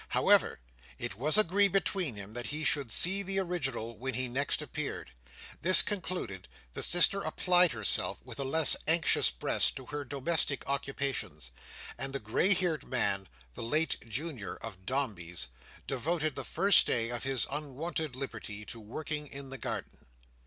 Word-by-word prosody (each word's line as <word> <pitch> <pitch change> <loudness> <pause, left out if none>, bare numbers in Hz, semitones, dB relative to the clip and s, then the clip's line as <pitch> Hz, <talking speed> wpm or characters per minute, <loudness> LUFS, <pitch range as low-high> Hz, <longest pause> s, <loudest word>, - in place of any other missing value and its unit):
However, - - +3 0.4
it - - -4
was 145 - +3
agreed 200 -1 +4
between 185 - 0
them 100 +1 -9
that 120 +1 -5
he 150 +2 -3
should 140 -6 0
see 190 - +7
the 195 0 +3
original 135 -11 -2
when 130 0 -3
he 130 +1 -2
next 135 +4 -1
appeared. - - -5 0.5
This 185 +1 +9
concluded, 170 - -5 0.3
the - - -5
sister 175 +3 +4
applied 180 -6 +3
herself, 110 -3 +2
with - - -10
a - - 0
less 150 +3 +4
anxious 165 -2 +4
breast, - - 0
to 130 - -9
her 145 +2 -5
domestic 145 +1 -1
occupations; 135 - -3 0.5
and 135 +1 -3
the 140 - -2
grey 135 - +2
haired 175 -4 -2
man, 100 - -1 0.3
late 155 +8 0
Junior 130 -2 -4
of 95 -5 -10
Dombey's, 95 - -3 0.4
devoted 155 +3 -2
the - - -3
first 200 0 +4
day 115 -1 0
of 120 -1 -4
his 135 -4 +1
unwonted 150 0 -4
liberty 105 -6 -7
to 115 - -8
working 150 +7 -5
in 135 -1 -9
the 135 - -7
garden. - - -7
140 Hz, 155 wpm, -30 LUFS, 115-165 Hz, 0.5 s, This